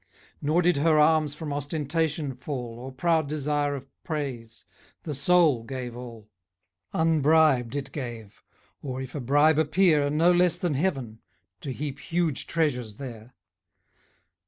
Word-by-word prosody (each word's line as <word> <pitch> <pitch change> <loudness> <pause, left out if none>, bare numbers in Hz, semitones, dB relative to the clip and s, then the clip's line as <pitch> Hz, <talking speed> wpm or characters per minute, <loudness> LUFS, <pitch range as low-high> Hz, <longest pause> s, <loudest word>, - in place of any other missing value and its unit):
Nor 155 +5 +2
did 175 -2 +3
her 155 +2 +3
alms 150 -1 +3
from 150 -1 -5
ostentation 150 0 -2
fall, 125 -3 -6
Or 130 +2 -7
proud 160 +2 +1
desire 145 -1 0
of 135 0 -8 0.2
praise 125 -7 -5 0.4
the 155 - -4
soul 145 -3 +3
gave 125 -1 -6
all: 115 -3 -10 0.6
Unbribed 155 -5 +3
it 140 -2 -4
gave; 120 -7 -7 0.4
or, 130 -2 -5
if 130 -2 -7
a 145 - -4
bribe 145 +4 +3
appear, 155 -2 +3
No 160 +4 +3
less 180 -1 +3
than 175 -4 -1
heaven, 135 -8 -2 0.4
to 135 - -5
heap 140 +1 -5
huge 165 +1 -1
treasures 125 -10 -1
there. 120 -3 -9
145 Hz, 135 wpm, -26 LUFS, 130-160 Hz, 0.6 s, did